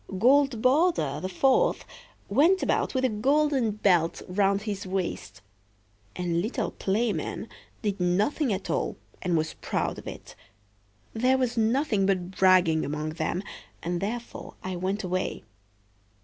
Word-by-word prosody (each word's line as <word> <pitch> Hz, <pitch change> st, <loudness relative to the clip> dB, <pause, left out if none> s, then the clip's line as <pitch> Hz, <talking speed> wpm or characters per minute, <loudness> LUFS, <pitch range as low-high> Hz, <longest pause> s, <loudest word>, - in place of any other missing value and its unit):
Goldborder, 255 Hz, -, +3 dB
the 185 Hz, -, -3 dB
fourth, 260 Hz, +8 st, +2 dB, 0.4 s
went 320 Hz, -, +3 dB
about -, -, 0 dB
with 260 Hz, 0 st, +2 dB
a -, -, +3 dB
golden 270 Hz, +2 st, +2 dB
belt 185 Hz, -6 st, +1 dB
round 195 Hz, +1 st, +1 dB
his 205 Hz, -3 st, -4 dB
waist; 170 Hz, -, -4 dB, 0.7 s
and 170 Hz, -1 st, -1 dB
little 220 Hz, +2 st, -2 dB
Playman 215 Hz, +3 st, -2 dB, 0.4 s
did 205 Hz, -2 st, -1 dB
nothing 210 Hz, -, +1 dB
at 195 Hz, -1 st, -3 dB
all, -, -, -1 dB, 0.2 s
and 175 Hz, -3 st, +1 dB
was 155 Hz, 0 st, -1 dB
proud -, -, -2 dB
of -, -, -11 dB
it. -, -, -9 dB, 0.8 s
There 255 Hz, +4 st, +2 dB
was 250 Hz, -2 st, 0 dB
nothing 225 Hz, -3 st, +1 dB
but 185 Hz, -2 st, 0 dB
bragging 185 Hz, -4 st, +4 dB
among 150 Hz, +2 st, -3 dB
them, 175 Hz, +3 st, -2 dB, 0.4 s
and 175 Hz, +1 st, -2 dB
therefore 230 Hz, +4 st, -5 dB
I 185 Hz, 0 st, -3 dB
went 190 Hz, +4 st, -2 dB
away." 185 Hz, 0 st, -2 dB
200 Hz, 135 wpm, -27 LUFS, 180-245 Hz, 0.8 s, bragging